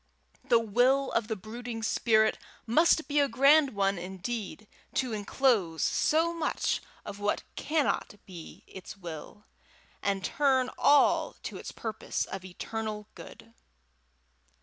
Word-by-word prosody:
The 250 -3 +4
will 245 +5 +2
of 230 -2 0
the 220 - -2
brooding 225 +3 -7
spirit 220 -1 +2 0.3
must 315 +6 +3
be 290 0 +1
a 285 - +4
grand 275 +2 +4
one, 195 -1 +1
indeed, 195 +4 -6 0.3
to 255 -3 0
enclose 205 - +1
so 330 +2 +2
much 335 - -1 0.2
of 200 - -7
what 205 0 -1
cannot 300 -8 -1
be 175 -4 -11
its 190 +1 -10
will, 175 +3 -9 0.6
and 195 -1 -1
turn 265 -3 +2
all 290 0 +4
to - - -6
its - - -7
purpose 220 -1 -4
of 190 -1 -7
eternal 210 +3 -5
good! 230 - -13
225 Hz, 125 wpm, -29 LUFS, 200-265 Hz, 0.6 s, The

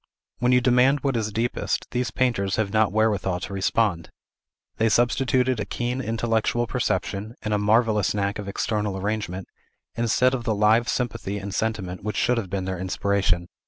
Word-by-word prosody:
When 125 +1 +2
you 125 0 +5
demand 130 +3 +4
what 135 -3 0
is 110 -2 -1
deepest, 115 +3 -1
these 125 0 -1
painters 115 -7 0
have 110 -2 -1
not 110 -2 +3
wherewithal 100 -4 +1
to 95 - -6
respond. 100 -3 0 0.7
They 110 0 +2
substituted 125 +1 +2
a - - 0
keen 125 +2 -2
intellectual 115 0 0
perception, 105 -2 -2
and 105 - -1
a 105 - +2
marvellous 105 -1 +2
knack 100 0 -1
of 100 - -6
external 105 0 -2
arrangement, 95 -2 -3 0.5
instead 120 +2 +2
of 125 -2 -2
the 110 -2 0
live 110 +3 +3
sympathy 115 -5 -2
and 100 -1 -6
sentiment 100 -5 -2
which 105 -2 -3
should 125 +3 +2
have 100 -5 -6
been 95 -1 -2
their 95 -1 -3
inspiration. 95 -1 0
110 Hz, 170 wpm, -24 LUFS, 100-120 Hz, 0.7 s, you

